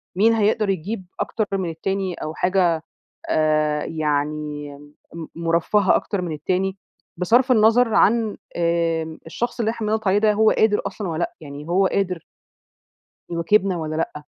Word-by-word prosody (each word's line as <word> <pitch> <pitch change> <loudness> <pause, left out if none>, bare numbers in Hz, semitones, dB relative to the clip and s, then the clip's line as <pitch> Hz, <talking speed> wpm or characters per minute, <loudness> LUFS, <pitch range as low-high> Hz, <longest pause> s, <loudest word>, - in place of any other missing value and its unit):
مين 220 +5 +4
هيقدر 215 -1 +2
يجيب 190 +2 -3
أكتر 215 - -1
من 185 -3 -2
التاني، 190 +3 -2
أو 155 - -5
حاجة 175 -3 +1 0.5
آآ 155 -1 +1
يعني 150 -1 -2 0.4
م 165 -1 -6
مرفّهة 170 +4 +2
أكتر 200 -3 -1
من 175 -2 -4
التاني، 185 +5 -1 0.4
بصرف 240 +9 +3
النظر 225 0 +4
عن 220 0 +3 0.2
آمم 165 -2 0
الشخص 240 +10 -4
اللي 225 -1 +1
إحنا 225 -2 -4
بنضغط 220 -1 0
عليه 190 +1 +4
ده، 210 0 +3
هو 220 +1 +4
قادر 215 -1 +2
أصلًا 205 -4 -5
والّا 160 -1 -3
لأ. - - -4
يعني 145 0 -9
هو 190 +2 +3
قادر 185 -4 -1 1.1
يواكبنا 180 +3 +1
والّا 155 -1 -4
لأ؟ 155 -2 -3
180 Hz, 150 wpm, -22 LUFS, 160-210 Hz, 1.1 s, مين